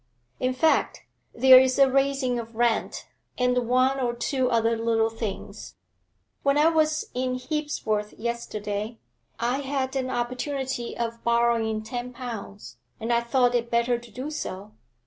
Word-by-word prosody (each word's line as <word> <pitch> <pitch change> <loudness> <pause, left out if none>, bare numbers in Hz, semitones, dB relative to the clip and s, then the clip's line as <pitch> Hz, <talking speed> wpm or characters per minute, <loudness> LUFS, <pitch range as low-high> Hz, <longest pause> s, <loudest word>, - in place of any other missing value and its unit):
In 255 0 0
fact, 320 +4 +2 0.3
there's 260 +1 +6
a 275 -1 +6
raising 270 -2 +1
of 230 -1 -8
rent, 235 -1 0 0.3
and 250 -1 +1
one 255 +2 +3
or 240 -2 -1
two 255 +1 0
other 230 0 +2
little 225 0 +1
things. 225 -3 -6 0.7
When 280 0 +2
I 305 +2 +5
was 310 -1 +1
in 255 0 -1
Hebsworth 255 -6 -2
yesterday 215 -2 -4 0.4
I 245 +3 0
had 270 -1 -2
an 260 -1 -1
opportunity 255 +1 -3
of 230 0 -4
borrowing 235 -2 +1
ten 245 +2 -5
pounds, 230 -5 -8 0.2
and 230 +2 -1
I 235 - +3
thought 245 +1 +2
it 235 -1 0
better 235 +1 +1
to 240 0 -14
do 255 +7 -6
so. 205 -8 -6
245 Hz, 145 wpm, -26 LUFS, 230-260 Hz, 0.7 s, there's